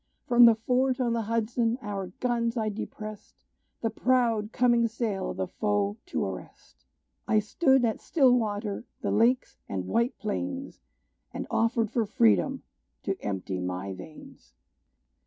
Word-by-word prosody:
From 240 -1 +7
the 230 -1 +7
fort, 250 +3 +1
on 240 -2 +1
the 230 - 0
Hudson, 230 +2 0
our 200 -4 -4
guns 235 -1 0
I 220 -1 0
depressed, 215 0 -8 0.4
The 225 - 0
proud 230 -3 +1
coming 240 -1 +3
sail 220 -4 -2
of - - -5
the 190 - 0
foe 205 +1 -1
to 350 - -1
arrest. - - -9 0.4
I 220 - +3
stood 265 +4 +3
at 225 - -1
Stillwater, 225 -8 +1 0.2
the - - -1
Lakes 245 +3 +2
and 95 -2 -3
White 235 - 0
Plains, 270 +6 -4 0.5
And - - -3
offered 230 -1 +1
for 230 -3 0
freedom 105 - +2 0.4
to - - -1
empty 95 -2 -3
my 90 +2 -3
veins! 95 - -13
225 Hz, 140 wpm, -28 LUFS, 205-240 Hz, 0.5 s, From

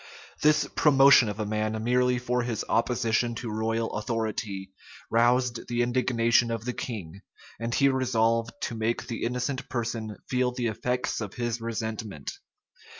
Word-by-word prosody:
This 150 0 +4
promotion 135 -5 +6
of 105 +1 -5
a 110 - -1
man 110 +1 -2
merely 125 +1 +2
for 125 0 0
his 120 -3 -3
opposition 115 0 +1
to 115 -1 -5
royal 115 +1 -1
authority, 105 -3 -3 0.4
roused 120 +1 +2
the 120 0 +1
indignation 120 -1 +2
of 115 -1 -3
the 125 - -2
king; 100 -8 -6 0.4
and 115 +1 -3
he 140 - +4
resolved 115 -3 +1
to - - -2
make 115 +1 -1
the 115 - -5
innocent 125 +2 -2
person 115 -3 -3
feel 125 -1 +1
the 125 -1 -2
effects 125 +3 -2
of 105 -2 -6
his 120 -1 -2
resentment. 110 -7 -4
115 Hz, 150 wpm, -27 LUFS, 110-125 Hz, 0.4 s, promotion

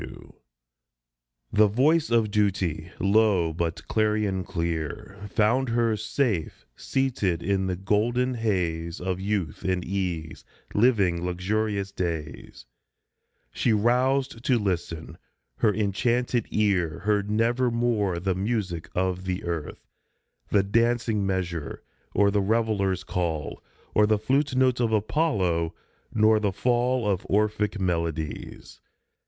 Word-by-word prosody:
S. - - -6
W. - - -13 1.2
THE 105 0 +6
voice 150 +10 +2
of 115 -3 +2
Duty, 95 -6 0
low, 100 -4 +3
but 85 0 -3
clarion 105 -3 +1
clear, 85 +4 -4
Found 120 +6 +2
her, 115 -1 +2
safe 110 - -2
seated 105 -11 -1
in 95 0 0
the 90 - -1
golden 115 +7 +1
haze 85 -8 -1
Of 90 0 -2
youth 95 -6 -2
and 90 -1 -1
ease, 90 -5 -3 0.3
living 100 -7 +3
luxurious 100 +3 -1
days. 75 -9 -5 0.9
She 115 - +1
roused 125 +3 +1
to 130 -2 +3
listen; 85 -6 -3 0.4
her 110 - +3
enchanted 115 +4 0
ear 95 -7 +1
Heard 105 -1 0
nevermore 115 -3 +1
the 95 +2 0
music 95 -4 -2
of 95 0 -1
the 90 0 -3
earth 85 -3 -5 0.6
The 100 -2 +3
dancing 115 -1 +1
measure, 85 -6 -3 0.3
or 100 0 +4
the 100 0 +2
reveler's 100 -3 0
call, 80 -5 -3 0.3
Or 105 0 +4
flute 135 +5 0
note 130 -1 +3
of 115 -2 +1
Apollo, 100 - +1 0.4
nor 110 0 +4
the 105 -2 0
fall 120 +2 +1
Of 100 -1 0
Orphic 105 0 +1
melodies. 85 -4 -3
100 Hz, 115 wpm, -26 LUFS, 90-115 Hz, 1.2 s, THE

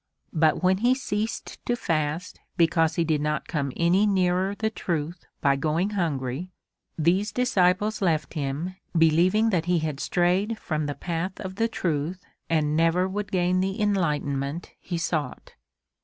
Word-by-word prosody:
But 160 0 +2
when 185 +1 +4
he 245 +3 +3
ceased 220 -4 -4
to 240 - +2
fast 160 -4 -2 0.2
because 165 -1 +3
he 170 - +2
did 155 -2 0
not 150 0 -1
come 140 -5 -2
any 180 +5 +3
nearer 190 0 +1
the 220 +1 -1
truth 170 -3 -3
by 140 -1 +3
going 160 +8 0
hungry, 155 -4 -2 0.5
these 180 +6 +2
disciples 210 -4 +2
left 165 -5 0
him, 155 +5 -3 0.2
believing 180 +8 +4
that 170 -4 +1
he 180 0 +2
had 155 -3 -2
strayed 185 +8 +1
from 155 -7 -2
the 145 - -3
path 175 +5 -3
of 190 0 -6
the 230 +1 +2
truth 175 -4 -2 0.2
and 155 -2 +1
never 165 +3 +3
would 200 +1 -4
gain 180 0 +2
the 190 +1 -1
enlightenment 150 -7 -1
he 175 - -4
sought. 160 -5 -3
175 Hz, 155 wpm, -26 LUFS, 155-190 Hz, 0.5 s, when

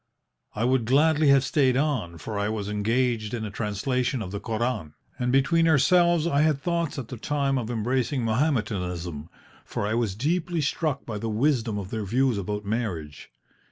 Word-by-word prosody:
I 110 +3 0
would 130 -2 +2
gladly 150 +4 +3
have 140 -1 +6
stayed 130 -2 +2
on, 130 - -1
for 105 +4 -5
I 100 +1 0
was 105 -2 -3
engaged 115 +1 0
in 110 -2 -4
a 105 - -5
translation 120 +4 -1
of 95 - -7
the 100 - -4
Koran, 115 -9 -3 0.2
and 125 0 0
between 165 +5 +3
ourselves 170 +2 +4
I 145 -4 +2
had 155 -2 +2
thoughts 170 0 -1
at 125 -4 -5
the 125 - -6
time 140 +2 0
of 115 -2 -4
embracing 125 +2 -1
Mahometanism, 95 - -1 0.3
for - - -3
I 105 - -1
was 115 -5 0
deeply 170 - -1
struck 145 -1 -1
by 110 -3 -4
the 115 +1 -3
wisdom 115 -1 +1
of 100 -1 -6
their 110 -2 -2
views 120 +2 +1
about 105 +2 -4
marriage. 95 -10 -4
120 Hz, 180 wpm, -26 LUFS, 105-140 Hz, 0.3 s, have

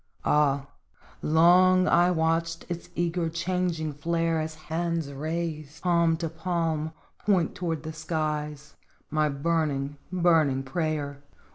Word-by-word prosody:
Ah! 140 -2 +3 0.6
long 180 +3 +5
I 175 +1 +5
watched 165 0 0
its 170 -1 -5
eager, 170 0 0
changing 170 -2 -1
flare 165 +2 0
As 155 0 -4
hands 160 -1 -3
raised, 155 +1 -4
palm 170 -2 +3
to 165 0 -2
palm, 160 -1 -2 0.3
point 185 -6 +2
toward 165 -4 -3
the 160 0 -5
skies 150 -2 -3 0.4
My 155 -1 +2
burning, 145 -1 -1
burning 165 -7 +3
prayer 145 -1 -2
160 Hz, 115 wpm, -27 LUFS, 150-170 Hz, 0.6 s, long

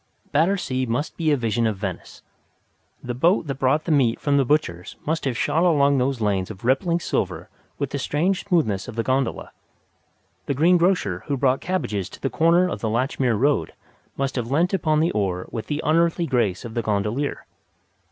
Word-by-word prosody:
Battersea 150 -5 +1
must 120 +7 -2
be 165 -2 0
a 145 - +3
vision 115 -1 0
of 105 -3 -2
Venice. 95 -3 -6 0.8
The 125 - -3
boat 165 - +2
that 140 -3 -5
brought 135 +4 +2
the 170 - -2
meat 130 -6 +2
from 145 -1 +1
the 140 - +4
butcher's 120 - -1
must 160 0 -1
have 125 -3 -1
shot 165 - +1
along 140 -5 +3
those 130 0 0
lanes 100 -4 0
of 110 +1 -9
rippling 165 +7 +2
silver - - -2 0.3
with 140 -2 -3
the 140 - -2
strange 175 +8 0
smoothness 145 - 0
of - - -8
the 115 - -1
gondola. 130 0 -1 1.0
The 140 - 0
greengrocer 170 - +2
who 140 - -1
brought 130 0 +2
cabbages 110 - -2
to - - -12
the 135 - -2
corner 170 +3 +3
of - - -4
the 110 - -1
Latchmere 125 0 0
Road 135 - +1 0.4
must 135 -1 -2
have 120 -1 -2
leant 165 +7 +1
upon 155 -4 +2
the 165 - +2
oar 95 -3 -2
with 115 -1 -5
the 150 +1 -3
unearthly 170 +2 +2
grace 120 - 0
of 115 - -7
the 120 - -1
gondolier. 110 +6 -2
135 Hz, 190 wpm, -23 LUFS, 115-160 Hz, 1.0 s, the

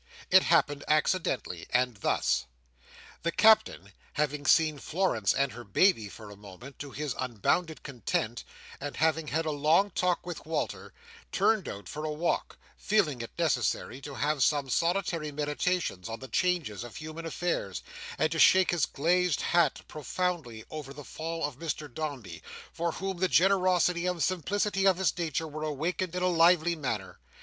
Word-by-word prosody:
It 190 - +8
happened 145 -5 +2
accidentally, 150 - 0
and 125 -2 +1
thus: 65 -8 0 0.7
The 170 - 0
Captain, 215 - +4 0.2
having 145 -1 -1
seen 155 -3 +4
Florence 155 - 0
and 140 -1 +1
her 120 +1 -9
baby 110 - +2
for 105 0 -11
a - - -10
moment, 105 +7 -12
to 145 - -6
his 145 0 -4
unbounded 130 - -1
content, 120 -2 -3 0.4
and 145 0 -6
having 160 0 +1
had 160 +3 -1
a 155 - 0
long 155 +7 +3
talk 180 -1 0
with 175 -3 -6
Walter, 160 +1 -3 0.4
turned 215 -5 +2
out 100 -2 -8
for 150 +9 -6
a 155 - -2
walk; 160 +3 -2 0.2
feeling 170 - +1
it 115 - -6
necessary 135 -4 0
to 140 0 -8
have 150 0 0
some 140 -1 +2
solitary 170 -1 0
meditation 150 - -1
on 115 0 -6
the 130 - -8
changes 170 - 0
of 120 -2 -10
human 155 +1 -7
affairs, 165 - -2 0.3
and 155 - +1
to 165 - -2
shake 185 +2 +6
his 175 -5 +1
glazed 175 0 +1
hat 170 -5 +2
profoundly 150 -6 -3
over 145 -3 -7
the 145 -1 -10
fall 165 +3 -5
of 145 -2 -6
Mr 155 -2 -4
Dombey, 135 - -5 0.3
for 170 0 -2
whom 195 -1 -4
the 185 - +3
generosity 180 -1 +3
and 180 -3 -1
simplicity 195 +2 0
of 190 -2 +4
his 190 - +1
nature 165 -2 -2
were 155 0 -7
awakened 165 +4 -2
in 180 - -1
a - - +3
lively 170 -1 +4
manner. 110 - -4
155 Hz, 165 wpm, -29 LUFS, 135-175 Hz, 0.7 s, It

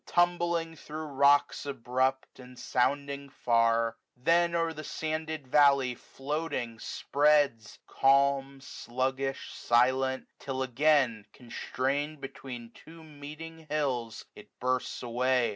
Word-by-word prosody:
Tumbling 175 -2 +1
thro' 155 0 -7
rocks 140 0 +3
abrupt, 130 0 -1
and 125 0 -13
sounding 140 +3 -1
far; 115 -3 +2 0.2
Then 170 +6 +3
o'er 165 -1 0
the 155 0 -8
sanded 155 -2 -4
valley 140 -2 +4
floating 135 -3 -4
spreads, 145 -7 +1
100 - - -20
Calm, 140 0 +3
sluggish, 130 +1 -3
silent; 130 +2 +2
till 130 -1 -3
again, 130 -4 +2
constraint 140 +5 -3
Between 130 -3 -8
two 165 +6 -14
meeting 155 +2 -10
hills, 130 -7 -2
it - - -13
bursts 125 0 -1
away. 125 0 +1
135 Hz, 110 wpm, -29 LUFS, 125-150 Hz, 0.2 s, valley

